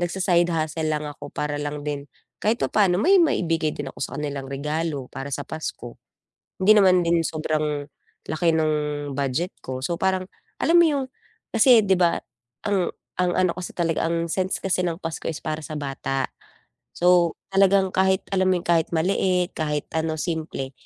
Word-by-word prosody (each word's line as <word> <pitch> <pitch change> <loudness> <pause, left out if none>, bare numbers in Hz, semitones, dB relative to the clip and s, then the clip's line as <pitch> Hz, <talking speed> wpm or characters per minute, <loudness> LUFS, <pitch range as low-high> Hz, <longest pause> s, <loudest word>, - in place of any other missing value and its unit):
nagsa-side 175 -1 +2
hustle 160 -1 -1
lang 150 -1 -1
ako 145 -1 -8
para 145 0 -3
lang 145 0 -4
din 145 -1 -4 0.3
kahit 220 +3 +2
papaano 190 -4 +3
may 380 +4 +6
maibigay 165 - +1
din 135 -2 -5
ako - - -15
sa - - -2
kanilang 140 -2 -4
regalo, 150 0 -3
para 135 +1 -6
sa 145 +1 -3
Pasko. 125 -6 -6 0.7
Hindi 215 +2 +8
naman 185 -2 +5
din 170 0 +3
sobrang 155 -2 -1 0.4
laki 160 +1 +1
ng 155 -1 +2 0.4
budget 140 +6 -1
ko. 130 0 -5
So 170 -1 -2
parang 190 -1 +1 0.4
alam 345 +1 +5
mo 340 - +7
yung 280 -3 0 0.5
kasi 245 -6 +6
'di 190 -2 +2
ba 170 -1 +2 0.4
ang 195 -4 +1 0.3
ang 180 -1 +2
ano 185 -2 +3
kasi 180 0 -7
talaga 165 -2 0
ang 170 0 -1
sense 185 0 -1
kasi 190 -1 +1
ng 175 -2 0
Pasko 165 -1 -4
is 160 - -4
para 155 0 -2
sa 155 +1 -7
bata. 135 -1 -2 0.7
So, 175 -1 +4 0.2
talagang 195 -1 +4
kahit 190 0 +2
alam 185 -1 +2
yung 175 - -2
kahit 165 -2 +2
maliit, 180 +1 +1
kahit 150 -2 -3
ano 160 0 -1
simple, 155 -5 -3
165 Hz, 170 wpm, -24 LUFS, 150-185 Hz, 0.7 s, Hindi